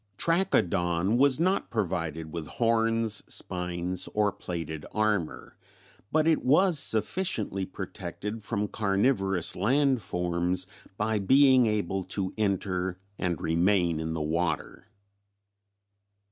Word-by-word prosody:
Trachodon 100 - +1
was 140 0 +5
not 185 +4 +1
provided 80 -7 -3
with 85 -3 -5
horns, 115 -2 +1
spines 90 0 -2
or 105 -1 +2
plated 80 -5 -6
armor, 105 -6 -1 0.6
but 155 0 +2
it 160 -1 +2
was 160 +4 +4
sufficiently 110 - 0
protected 95 +3 -6
from 105 -1 -2
carnivorous 95 -3 +1
land 130 +5 +2
forms 90 0 0 0.3
by 110 0 0
being 130 +3 +5
able 95 -3 -1
to 95 0 -3
enter 95 -3 -1 0.2
and 90 -2 -1
remain 85 0 +1
in 80 0 -3
the 80 -1 -2
water. 80 +5 -2
100 Hz, 105 wpm, -28 LUFS, 90-115 Hz, 0.6 s, was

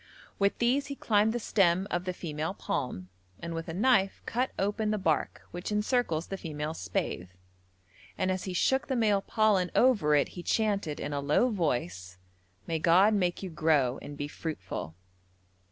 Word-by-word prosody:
With 200 0 +2
these 255 +4 +1
he 280 - -5
climbed 215 -3 +2
the 240 - -2
stem 190 -3 +2
of 175 +1 -1
the 185 - -1
female 160 +1 -4
palm, 125 - -3 0.3
and 170 +6 -5
with 165 0 -5
a - - -4
knife 200 -2 +3
cut 250 +3 0
open 210 +2 0
the 215 - +1
bark 165 -6 -1
which 175 +4 -5
encircles 210 -6 0
the 195 - -6
female 150 -1 -4
spathe, 90 - -3 0.9
and 185 - +1
as 185 0 -3
he 185 - -4
shook 265 +8 +2
the 265 - -1
male 210 -4 +3
pollen 205 -4 +2
over 210 -13 +4
it 145 - +2
he 175 - -8
chanted 200 -6 0
in 145 - -4
a 145 - -1
low 150 - +3
voice, 95 - -2 0.5
'May 165 -1 -1
God 180 +6 +5
make 180 -2 0
you 185 - -5
grow 150 -5 +2
and 145 0 -8
be 145 - -3
fruitful.' 95 - -6
180 Hz, 175 wpm, -29 LUFS, 150-210 Hz, 0.9 s, God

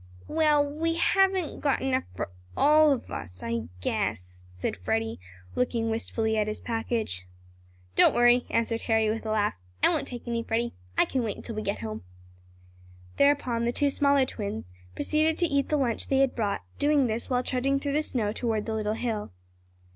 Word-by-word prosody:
"We 315 0 +1 0.2
we 320 +3 -1
haven't 380 0 +2
got 280 -2 +1
enough 260 -1 +1
for 90 - -4 0.3
all 305 +1 +6
of 270 - -2
us 90 +1 -7
I 115 -1 -2 0.2
guess," 90 -2 -2
said 90 0 -3
Freddie, 110 +4 -2 0.3
looking 230 -2 0
wistfully 220 0 -1
at 210 -1 +1
his 215 - -3
package. 225 - -2 0.7
"Don't - - +6
worry!" 240 +1 +5
answered 230 0 0
Harry 220 -1 +3
with 225 0 -4
a - - -1
laugh. 210 -1 +1 0.3
"I - - +7
won't - - 0
take 240 -1 -8
any, 235 -1 -1
Freddie. 230 +1 -1 0.2
I - - +5
can 260 - -1
wait 220 -4 -3
until 230 - -7
we 215 - -3
get 200 -1 -3
home." 110 -2 -5 1.1
Thereupon 260 -5 +3
the 240 - +2
two 285 +3 +1
smaller 280 -1 +3
twins 200 - -5 0.2
proceeded 310 - +1
to 350 - +2
eat 280 -4 0
the 300 - +2
lunch 245 -5 0
they 270 - +2
had 270 -1 +3
brought, 205 -4 -1 0.2
doing 290 -1 +3
this 225 0 -2
while 250 -1 +1
trudging 270 +2 0
through 280 0 -2
the 300 - +2
snow 230 -8 -1
toward 220 -3 -1
the 225 - -2
little 215 -1 -1
hill. 220 - -3
235 Hz, 185 wpm, -27 LUFS, 215-275 Hz, 1.1 s, I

